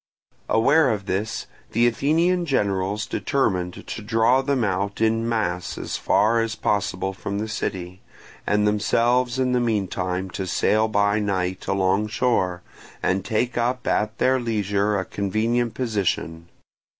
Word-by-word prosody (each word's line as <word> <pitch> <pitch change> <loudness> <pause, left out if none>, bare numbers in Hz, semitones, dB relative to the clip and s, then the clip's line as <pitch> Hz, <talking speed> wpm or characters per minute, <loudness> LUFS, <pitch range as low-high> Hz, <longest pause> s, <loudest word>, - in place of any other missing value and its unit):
Aware 140 +6 +4
of 105 -4 -2
this, 105 +4 -2 0.3
the 115 +2 +3
Athenian 165 +8 +2
generals 100 -4 0
determined 95 -13 -1
to - - -6
draw 115 +4 +3
them 135 -2 0
out 100 0 -1
in 115 +1 +1
mass 90 -6 -2
as - - -4
far 115 +2 +2
as 115 0 -2
possible 95 -2 -1
from 100 +1 -5
the 110 +2 -2
city, 90 -4 -4 0.5
and 105 0 +2
themselves 120 +4 +2
in 130 -1 +1
the 125 - +2
meantime 95 -5 -1
to 95 0 -4
sail 110 +3 +2
by 100 0 +2
night 95 -3 -2
alongshore, 100 -1 +1 0.4
and 95 +1 +1
take 120 +3 -1
up 125 +1 -1
at 105 +1 0
their 130 0 +2
leisure 105 -3 0
a 95 - -2
convenient 110 +4 -1
position. 90 -8 -2
105 Hz, 140 wpm, -23 LUFS, 95-120 Hz, 0.5 s, Aware